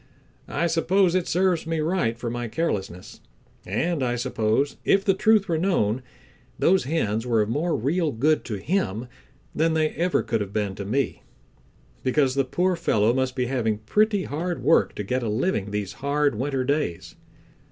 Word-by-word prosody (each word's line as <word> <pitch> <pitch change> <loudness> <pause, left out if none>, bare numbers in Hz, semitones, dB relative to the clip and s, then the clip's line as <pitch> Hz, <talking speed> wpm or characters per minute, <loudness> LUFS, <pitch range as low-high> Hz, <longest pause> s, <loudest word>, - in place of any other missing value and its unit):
I 170 - -1
suppose 175 +2 +2
it 185 -2 0
serves 180 -2 +1
me 165 -1 -1
right 155 -8 0
for 120 -1 -4
my 120 0 -3
carelessness, 100 - -3 0.5
and 160 - -1
I 120 -1 0
suppose 120 +2 0
if 195 0 +3
the 195 - +4
truth 210 +1 +3
were 165 -3 0
known, 130 - +1 0.6
those 185 -2 +3
hens 115 -6 -1
were 115 -3 +3
of 105 - -5
more 155 +7 0
real 155 +6 0
good 150 +7 +1
to 110 - -3
him 120 - -2 0.5
than 160 +1 +1
they 155 -1 +2
ever 175 +3 0
could 115 -2 -1
have 100 -1 -5
been 105 -2 -1
to 100 +1 -6
me, 130 +7 -1 0.8
because 130 0 +2
the 135 0 +2
poor 180 +7 +1
fellow 110 -9 +2
must 130 0 -1
be 125 - 0
having 115 -4 0
pretty 205 - +1
hard 170 +4 -3
work 165 - +3
to 105 - -4
get 125 +6 -1
a 115 - -2
living 110 - -1
these 105 -1 -3
hard 145 +1 0
winter 130 +3 -1
days. 140 - -2
135 Hz, 175 wpm, -24 LUFS, 110-170 Hz, 0.8 s, the